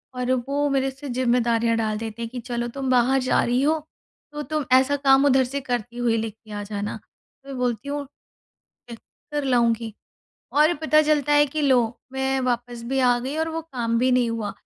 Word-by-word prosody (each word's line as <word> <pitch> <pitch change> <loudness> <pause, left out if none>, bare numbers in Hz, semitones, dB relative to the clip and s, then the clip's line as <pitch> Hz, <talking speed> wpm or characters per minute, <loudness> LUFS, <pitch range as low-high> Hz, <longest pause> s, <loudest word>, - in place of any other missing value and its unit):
और 250 0 -1 0.2
वो 285 +1 0
मेरे 270 -1 0
से 270 +1 -9
ज़िम्मेदारियाँ 235 -2 +1
डाल 215 -1 -1
देते 225 +1 -6
हैं 230 - -4
कि, 250 +1 -6
"चलो 240 0 -3
तुम 265 +2 -4
बाहर 255 +2 +3
जा - - +3
रही 245 +2 +1
हो 315 +2 +2 0.5
तो, 295 - -4
तुम 305 +1 -2
ऐसा 265 +2 +2
काम 270 0 +4
उधर 265 -2 +4
से 265 +3 -3
करती 245 -2 -4
हुई 235 -2 +1
ले 225 0 -2
के 220 0 -17
आ 205 0 -4
जाना"। 205 0 -4
तो 275 - -22
मैं 270 - -6
बोलती 250 +1 -2
हूँ, 285 0 -3 0.9
"कर 290 +5 -7
लाऊँगी", 235 -4 +1 0.6
और 305 +4 +4
पता 310 -1 +4
चलता 295 -1 +1
है 295 0 +5
कि 305 +2 -4
लो, 265 -3 +4 0.3
मैं 265 0 0
वापस 240 -1 -2
भी 270 +1 0
आ 245 -1 +3
गई 265 +5 -4
और 320 +1 0
वो 325 0 -3
काम 240 -7 -2
भी 255 +2 +2
नहीं 245 -2 +2
हुआ। 220 -3 -3
255 Hz, 205 wpm, -23 LUFS, 235-280 Hz, 0.9 s, है